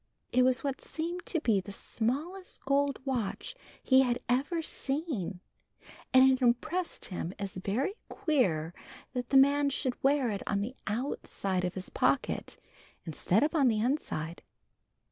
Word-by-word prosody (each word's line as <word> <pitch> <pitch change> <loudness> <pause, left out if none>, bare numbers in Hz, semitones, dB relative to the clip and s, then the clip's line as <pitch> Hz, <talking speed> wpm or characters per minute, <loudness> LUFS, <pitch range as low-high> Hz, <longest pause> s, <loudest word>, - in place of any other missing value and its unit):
It 255 - +4
was 255 0 +2
what 275 -2 -2
seemed 340 +2 -4
to 330 - +1
be 220 -9 +2
the 200 - -9
smallest 290 - -3
gold 280 0 +2
watch 255 - -2 0.3
he 260 0 +6
had 245 -2 +2
ever 285 +7 +1
seen, 270 - -3 0.7
and 260 +1 +7
it 260 0 0
impressed 255 +9 0
him 180 -1 -4
as 200 -2 -5
very 215 - -1 0.2
queer 195 - +1 0.4
that 245 -1 -3
the 275 - +5
man 280 +1 +5
should 260 -2 -2
wear 270 -3 +3
it 200 - -3
on 200 -1 +1
the 240 +6 -4
outside 205 -5 -2
of 180 0 -2
his 185 -1 -6
pocket - - 0 0.5
instead 175 - +2
of 305 - +2
the 260 -9 +3
inside. 210 - -1
255 Hz, 145 wpm, -30 LUFS, 200-285 Hz, 0.7 s, and